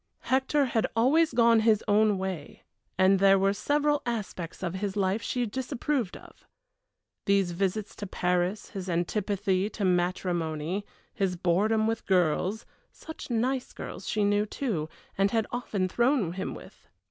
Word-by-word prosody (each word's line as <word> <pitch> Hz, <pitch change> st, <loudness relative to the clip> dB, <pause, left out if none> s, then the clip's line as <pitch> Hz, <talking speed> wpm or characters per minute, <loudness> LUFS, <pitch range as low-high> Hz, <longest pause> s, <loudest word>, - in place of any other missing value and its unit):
Hector 270 Hz, +2 st, +2 dB
had 230 Hz, -3 st, 0 dB
always 300 Hz, +8 st, +4 dB
gone 230 Hz, -1 st, +5 dB
his 220 Hz, -1 st, +3 dB
own 210 Hz, -1 st, +4 dB
way, 185 Hz, -6 st, -5 dB, 0.3 s
and 190 Hz, +1 st, +4 dB
there 195 Hz, 0 st, +6 dB
were 195 Hz, +1 st, +2 dB
several 295 Hz, +7 st, +1 dB
aspects 200 Hz, -7 st, -5 dB
of 175 Hz, -1 st, -2 dB
his 195 Hz, +1 st, -3 dB
life 195 Hz, +2 st, +1 dB
she 245 Hz, -1 st, -1 dB
disapproved 260 Hz, -1 st, -2 dB
of. -, -, -18 dB, 0.8 s
These 195 Hz, -2 st, +3 dB
visits 195 Hz, +4 st, -2 dB
to 205 Hz, -, -5 dB
Paris 180 Hz, +2 st, -1 dB
his 190 Hz, -2 st, -5 dB
antipathy 195 Hz, +2 st, 0 dB
to 210 Hz, -2 st, -3 dB
matrimony 175 Hz, 0 st, -1 dB, 0.3 s
his 190 Hz, -2 st, 0 dB
boredom 200 Hz, +6 st, +2 dB
with 225 Hz, 0 st, -2 dB
girls 185 Hz, +3 st, +1 dB, 0.3 s
such 320 Hz, -, -10 dB
nice 250 Hz, +2 st, -1 dB
girls -, -, -7 dB
she 215 Hz, -, +1 dB
knew, 205 Hz, +1 st, +2 dB
too, 195 Hz, -, -3 dB, 0.3 s
and 195 Hz, +1 st, +4 dB
had 225 Hz, 0 st, +1 dB
often 205 Hz, -6 st, -1 dB
thrown 235 Hz, -, +1 dB
him 190 Hz, -, -4 dB
with! -, -, -14 dB
205 Hz, 145 wpm, -28 LUFS, 185-230 Hz, 0.8 s, there